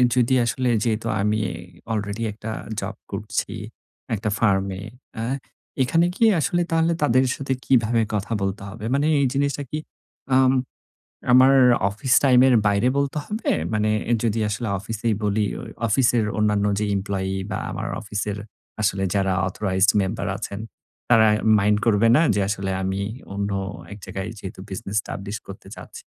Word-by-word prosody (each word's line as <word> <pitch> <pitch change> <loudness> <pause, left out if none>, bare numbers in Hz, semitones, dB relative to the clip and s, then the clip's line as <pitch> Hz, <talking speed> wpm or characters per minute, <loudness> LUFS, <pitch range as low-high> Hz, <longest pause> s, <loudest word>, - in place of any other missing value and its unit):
যদি 125 0 +3
আসলে 125 +2 0
যেহেতু 115 -1 -1
আমি 105 +1 +1 0.5
অলরেডি 105 +1 -2
একটা 110 +1 -8 0.3
জব - - -5 0.2
করছি, - - -3 0.6
একটা 105 +1 -2
ফার্ম 100 -4 +3
এ, - - -7 0.4
আ - - -2 0.6
এখানে 165 +7 +3
কি, - - 0 0.2
আসলে 175 +3 +1
তাহলে 165 +1 +2
তাদের 130 -1 +4
সাথে 135 -1 -2
কিভাবে 115 -2 +3
কথা 105 +1 -2
বলতে 95 +1 -2
হবে? 105 +2 -8
মানে 140 +2 +2
এই - - +3
জিনিসটা 140 +1 0
কি, 150 - -2 0.6
আম 130 0 +5 0.8
আমার 130 +2 +7 0.4
অফিস 110 +5 -1
টাইম 130 -3 +6
এর 130 - +5
বাইরে 100 +4 +2
বলতে 140 +1 0
হবে? 215 +2 -3 0.2
মানে 110 0 +1 0.3
যদি 115 -1 +1
আসলে 105 +3 -3
অফিসেই 110 +2 -2
বলি, 105 +1 +1
অ - - -7 0.3
অফিসের 115 0 +3
অন্যান্য 105 -1 +2
যে 105 - 0
এমপ্লয়ি 95 -1 -2 0.2
বা - - -1
আমার - - -4
অফিসের 105 -1 -3 0.4
আসলে 100 -2 +1
যারা 95 -2 +1
অথরাইজড 95 +1 +2
মেম্বার 100 +1 -2
আছেন, 100 -2 -5 0.5
তারা 115 -2 +6 0.3
মাইন্ড 105 +1 +3
করবে 115 0 +4
না? 150 - +5
যে - - +1
আসলে 100 -2 -2
আমি 95 +1 -1 0.3
অন্য 100 0 -2 0.4
এক - - -10
জায়গায় 95 +2 -5
যেহেতু 95 -2 -8
বিজনেস 100 +1 -5
এস্টাবলিশ 100 +1 -4
করতে 95 0 -10
চাচ্ছি? - - -11
105 Hz, 155 wpm, -23 LUFS, 100-125 Hz, 0.8 s, আমার